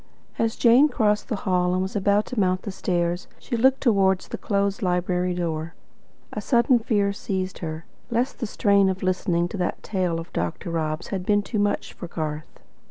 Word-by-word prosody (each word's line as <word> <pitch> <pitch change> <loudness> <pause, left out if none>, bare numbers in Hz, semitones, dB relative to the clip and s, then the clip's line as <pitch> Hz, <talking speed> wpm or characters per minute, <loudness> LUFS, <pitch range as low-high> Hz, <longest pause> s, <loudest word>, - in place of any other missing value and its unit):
As 225 -1 +1
Jane 250 +5 +5
crossed 210 -5 +1
the 225 - 0
hall 180 -2 +2
and 185 - +1
was 190 - -5
about 205 +1 +2
to 250 - -4
mount 185 -1 +1
the 205 - -4
stairs, 175 -2 -1
she - - -4
looked 260 +3 +3
towards 195 -6 +2
the - - -4
closed 200 -1 0
library 180 0 0
door. 165 -2 -3 0.6
A - - -3
sudden 240 0 +3
fear 205 -3 +1
seized 190 -2 -3
her, 160 -1 -5 0.2
lest 240 +3 -1
the 230 - -2
strain 200 -2 +3
of 190 0 -3
listening 180 -2 +1
to 205 - -6
that 180 -2 -2
tale 180 -5 -1
of 165 - -9
Dr. 90 - -3
Rob's 160 0 -2
had 190 -3 -3
been 205 +2 +2
too 215 +1 -2
much 205 0 0
for 175 - -8
Garth. 155 -2 -5
190 Hz, 190 wpm, -24 LUFS, 175-210 Hz, 0.6 s, Jane